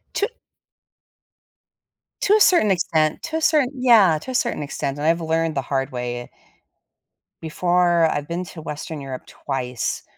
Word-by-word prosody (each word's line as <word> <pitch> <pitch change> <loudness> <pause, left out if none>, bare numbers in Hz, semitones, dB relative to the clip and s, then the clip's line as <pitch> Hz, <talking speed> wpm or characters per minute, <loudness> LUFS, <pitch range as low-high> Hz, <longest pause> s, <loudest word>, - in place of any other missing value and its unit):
To 415 - 0 1.9
to 405 - +3
a 430 - +5
certain 345 - +5
extent, 160 -4 +1
to 320 - -4
a - - -3
certain 305 -5 +3
yeah, 230 -10 +5
to 260 - -7
a - - -4
certain 150 - 0
extent, 140 -1 -4
and 145 - -3
I've 165 +1 +2
learned 165 0 0
the 135 - 0
hard 135 +1 -2
way 120 -1 -5 1.1
Before, 175 +1 +2
I've 145 0 -3
been 175 +3 -3
to 165 -2 -10
Western 150 0 -6
Europe 135 -2 -7
twice, 125 -3 -4
165 Hz, 155 wpm, -22 LUFS, 140-190 Hz, 1.9 s, a